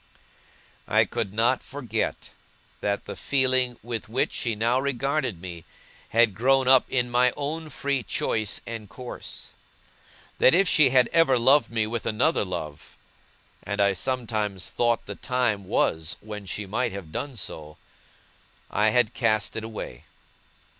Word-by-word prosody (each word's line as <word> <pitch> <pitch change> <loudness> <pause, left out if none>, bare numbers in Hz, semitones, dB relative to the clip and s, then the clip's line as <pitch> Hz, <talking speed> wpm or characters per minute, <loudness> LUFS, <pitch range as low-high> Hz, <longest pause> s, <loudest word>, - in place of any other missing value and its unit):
I - - +4
could 95 - -3
not 115 +4 +2
forget 135 -3 -4 0.5
that 100 0 -1
the - - -6
feeling 130 -3 +1
with 115 -2 -5
which 125 +4 0
she 115 -3 -1
now 115 +4 +2
regarded 135 - -1
me 85 -2 -8 0.5
had 115 -2 +4
grown 130 +5 +2
up 130 -1 +6
in 125 -2 0
my 125 +1 +4
own 155 +2 -3
free 140 -1 -1
choice 110 -1 -1
and 115 -3 -7
course. 125 +2 -8 0.9
That 130 - +6
if 195 +1 +4
she 155 -4 +5
had 125 -1 +4
ever 165 -6 +4
loved 135 +5 +4
me 115 -2 0
with 115 +1 -4
another 125 +8 +2
love 80 -6 -7 0.6
and 100 +1 -4
I 100 -1 +4
sometimes 110 -4 -2
thought 120 -1 +1
the - - -5
time 120 -6 -1
was 80 -2 0
when 105 -2 -8
she 105 +2 -3
might 115 +3 -1
have 95 -5 -8
done 140 - -4
so 75 -6 -7 0.9
I 105 +1 +3
had 120 -1 +2
cast 110 0 +1
it 110 - -4
away. 110 - -7
115 Hz, 145 wpm, -25 LUFS, 105-130 Hz, 0.9 s, up